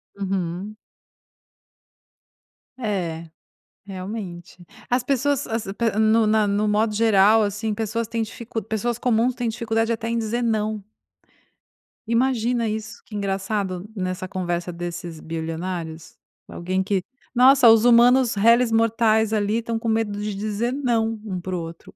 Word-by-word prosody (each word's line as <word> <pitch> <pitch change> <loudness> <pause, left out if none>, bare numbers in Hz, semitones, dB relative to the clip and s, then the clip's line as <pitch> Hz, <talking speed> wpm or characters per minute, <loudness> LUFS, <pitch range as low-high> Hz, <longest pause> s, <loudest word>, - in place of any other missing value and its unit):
Uhum. 195 0 -3 2.0
É, 175 -8 -3 0.6
realmente. 185 -3 -7 0.2
As 245 +1 +2
pessoas 280 +1 0
as 225 -2 -3
a 195 - -4
pe 230 +1 0
no 220 0 +4
na 215 0 +3
no 205 +1 +1
modo 210 +1 +1
geral, 215 0 +5
assim, 210 +1 -2
pessoas 225 +1 -2
têm 230 0 -2
dificu 225 0 -5
pessoas 220 +3 -2
comuns 245 +1 +2
têm 240 -2 -2
dificuldade 225 0 -1
até 230 0 -2
em 235 - 0
dizer 230 +1 -1
"não". 215 -2 -1 1.2
Imagina 235 -1 +1
isso, 215 0 -5
que 215 - -10
engraçado, 195 -1 -2
nessa 185 -1 -3
conversa 175 -2 -3
desses 170 -1 -6
bilionários, 165 0 -5 0.3
alguém 185 +2 -2
que: 195 -1 0 0.3
"Nossa, 255 -1 +7
os 225 +1 +6
humanos 245 0 +5
reles 230 +3 +4
mortais, 225 -1 +2
ali, 215 +1 +1
estão 230 0 -3
com 230 - -5
medo 220 -2 0
de 210 -1 -3
dizer 215 +4 -2
não 230 -5 0
um 190 -4 -4
para 185 +1 -4
o 175 - -2
outro". 165 0 -10
215 Hz, 140 wpm, -23 LUFS, 190-230 Hz, 2.0 s, Nossa